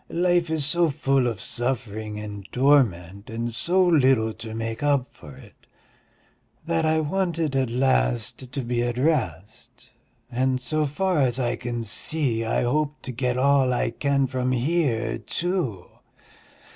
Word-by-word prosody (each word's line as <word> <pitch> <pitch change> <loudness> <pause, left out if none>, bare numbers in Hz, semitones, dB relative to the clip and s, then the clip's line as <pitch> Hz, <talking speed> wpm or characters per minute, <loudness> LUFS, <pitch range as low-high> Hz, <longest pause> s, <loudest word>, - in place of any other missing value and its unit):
Life 175 -1 +1
is 160 -3 0
so 170 +2 +2
full 135 -3 +1
of 115 -5 -3
suffering 110 -2 -3
and 105 -2 -8
torment 105 - +2
and 115 +1 -3
so 180 +9 +2
little 130 -9 +3
to 110 0 -8
make 115 +1 -4
up 140 -3 +2
for 70 -3 -14
it... - - -18 1.0
that 165 -1 0
I 160 0 +2
wanted 165 -2 -1
at 130 -2 +1
last 115 - 0
to 135 - -3
be 120 -1 -1
at 120 0 -2
rest, 110 - -2 0.4
and 130 +1 +1
so 150 +5 -1
far 180 +4 0
as 130 -3 +2
I 125 -3 0
can 120 -1 -4
see 115 +1 -1
I 115 - 0
hope 150 +4 -1
to 130 - -5
get 125 +1 -1
all 135 -1 +3
I 125 - 0
can 140 -1 +1
from 130 0 -1
here 125 -4 0
too." 135 - -2
130 Hz, 150 wpm, -24 LUFS, 115-150 Hz, 1.0 s, little